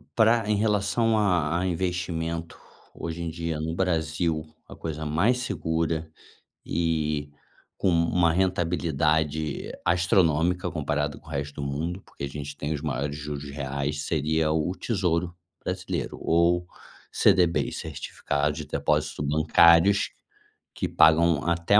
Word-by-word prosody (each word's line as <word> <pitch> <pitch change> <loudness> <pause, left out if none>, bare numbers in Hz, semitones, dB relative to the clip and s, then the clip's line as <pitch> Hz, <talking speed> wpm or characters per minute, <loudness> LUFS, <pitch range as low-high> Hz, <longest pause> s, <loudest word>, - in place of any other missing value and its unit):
para 110 -1 +4
em 105 - +3
relação 105 +2 +2
a 85 -6 +2
a 90 - -1
investimento, 85 -2 -2 0.4
hoje 85 0 -5
em 85 - -2
dia, 85 -1 -3
no 80 +1 -3
Brasil, 80 -2 0 0.2
a - - -11
coisa 80 -1 -5
mais 100 +12 +2
segura 80 -6 -2 0.6
e 75 -3 -1 0.5
com - - 0
uma 85 0 +3
rentabilidade 80 -4 0
astronômica, 85 0 +2
comparada 75 -3 -2
com - - -18
o - - -11
resto 70 +1 -4
do 70 - -2
mundo, 85 +7 -3
porque - - -7
a - - -4
gente 70 0 -7
tem 75 +2 -2
os 70 - -4
maiores 70 -1 -2
juros 70 -1 -6
reais, 70 +1 -3
seria 80 0 +1
o 80 +3 0
tesouro 90 -6 -1 0.3
brasileiro, 90 -5 -3
ou 85 +1 +2 0.5
CDB's 85 -2 +3
certificados 70 +1 -2
de - - -5
depósito - - 0
bancários, 85 +6 +5 0.7
que - - -2
pagam 80 -1 +4
até 85 +5 +4
80 Hz, 130 wpm, -26 LUFS, 75-90 Hz, 0.7 s, bancários